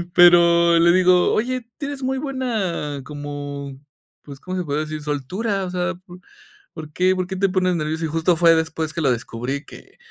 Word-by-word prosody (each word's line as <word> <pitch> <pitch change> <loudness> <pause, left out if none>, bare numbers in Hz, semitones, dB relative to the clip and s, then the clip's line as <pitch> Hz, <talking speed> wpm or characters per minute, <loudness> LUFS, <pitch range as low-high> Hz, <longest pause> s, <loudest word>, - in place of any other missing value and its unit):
Pero 170 -1 +6
le 170 +1 +5
digo: 180 -1 +4
"Oye, 245 +1 -2
tienes 280 -1 -5
muy 265 0 -1
buena, 220 - -3
como, 145 -1 -7 0.4
pues, 140 -2 -11
¿cómo 185 +3 -6
se 180 - -1
podría 150 0 -2
decir?, 155 0 -6
soltura, 185 - -3
o - - -5
sea, 180 0 -2
¿po 180 0 -15 0.5
por 155 -2 -9
qué 185 +1 +2
por 185 -1 -2
qué 190 - -5
te 195 +1 +1
pones 185 -1 +1
nervioso?", 160 0 -2
y - - -1
justo 165 +2 +1
fue 165 -1 +5
después 160 -1 -2
que 170 - -3
lo 135 -4 +2
descubrí 125 +4 -4
que, - - -15
170 Hz, 190 wpm, -21 LUFS, 150-185 Hz, 0.5 s, Pero